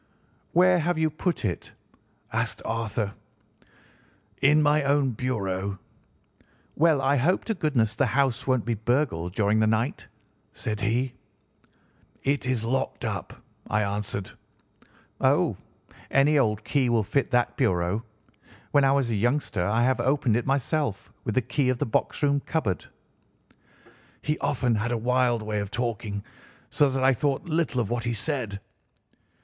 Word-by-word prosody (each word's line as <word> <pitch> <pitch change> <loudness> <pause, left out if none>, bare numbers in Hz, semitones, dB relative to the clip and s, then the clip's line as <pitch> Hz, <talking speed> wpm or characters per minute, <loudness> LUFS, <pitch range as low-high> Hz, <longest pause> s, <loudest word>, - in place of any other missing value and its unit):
"'Where 180 +1 +5
have 170 +1 0
you 160 -1 +1
put 165 -2 -2
it?' 90 -4 -3 0.6
asked - - -1
Arthur. 110 -2 -2 1.3
"'In 150 +2 +5
my 150 0 +4
own 140 -1 +2
bureau.' 100 -5 -2 1.0
"'Well, 160 -2 +4
I 140 +2 +3
hope 165 +9 +1
to 225 - 0
goodness 130 - 0
the - - +2
house 135 -3 0
won't 130 -4 +2
be 120 - 0
burgled 110 - -1
during 105 0 +2
the 110 - +3
night.' 110 +5 -1 0.5
said 105 -1 -4
he. 120 +5 0 1.1
"'It 140 -1 0
is 125 -3 0
locked 130 +4 -2
up,' - - -5 0.3
I 105 0 +2
answered. 100 -1 -3 0.9
"'Oh, - - +3 0.5
any 145 +3 +4
old 105 -4 +1
key 135 -1 +1
will 115 -2 +2
fit 125 +6 0
that 120 0 +1
bureau. 95 -3 +1 0.7
When 145 - +4
I 135 0 +4
was 135 -4 +1
a - - 0
youngster 120 -3 0
I 115 +3 +2
have 130 +1 +2
opened 130 -3 +2
it 120 - -1
myself 140 -4 -1
with 110 - -2
the 130 - +2
key 135 +2 0
of 130 - +1
the - - -1
box 115 - -1
room 140 0 +3
cupboard.' 125 - -2 1.4
"He 150 +1 -1
often 130 -4 +1
had 110 +3 -1
a 120 - +1
wild 120 -1 +1
way 105 -1 -2
of 100 -1 -3
talking, 110 -3 -3 0.5
so 145 -2 +3
that 130 0 -1
I 135 +1 +5
thought 135 +2 -1
little 160 -6 0
of 115 -2 -1
what 120 0 -1
he 120 - 0
said. 115 -5 -2
125 Hz, 155 wpm, -26 LUFS, 110-140 Hz, 1.4 s, Where